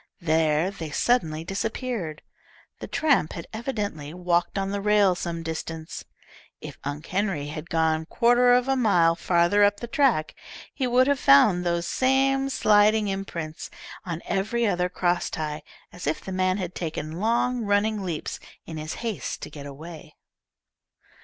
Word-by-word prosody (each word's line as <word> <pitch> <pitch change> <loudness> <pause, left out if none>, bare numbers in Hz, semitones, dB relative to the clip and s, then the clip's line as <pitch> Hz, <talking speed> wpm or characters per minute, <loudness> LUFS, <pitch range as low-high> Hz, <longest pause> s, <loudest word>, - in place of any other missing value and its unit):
There 160 +1 +2
they 165 -5 -7
suddenly 160 -3 +1
disappeared. 195 - -4 0.6
The - - -6
tramp 285 - +1
had 170 - -7
evidently 205 - -4
walked 175 +1 0
on 195 0 -1
the 200 0 -2
rail 205 -2 +4
some 170 -2 -4
distance. 160 0 -6 0.5
If - - -9
Unc' 145 +2 -5
Henry 185 -7 -1
had 155 +3 -7
gone 160 -1 +1
quarter 245 +3 +4
of 245 +1 +4
a 270 - +2
mile 180 -9 +4
farther 175 +4 +3
up 205 0 +3
the - - -5
track, 235 - +1 0.4
he 260 - -1
would 250 +1 +4
have 285 0 +1
found 175 - +5
those 170 -1 0
same 270 +5 +2
sliding 210 -3 +3
imprints 170 -5 -5 0.3
on 170 -2 -5
every 225 +5 0
other 180 -3 +1
crosstie, 165 -4 -1 0.3
as 175 -4 -7
if 155 - 0
the 190 - -8
man 185 0 +1
had 180 -3 -4
taken 160 -1 -5
long 235 +3 +1
running 205 +1 +1
leaps 170 -5 -4 0.3
in 160 - -7
his 155 +1 -5
haste 205 - -4
to - - -7
get 145 -1 -9
away. 155 +4 -10
180 Hz, 155 wpm, -25 LUFS, 160-220 Hz, 0.6 s, found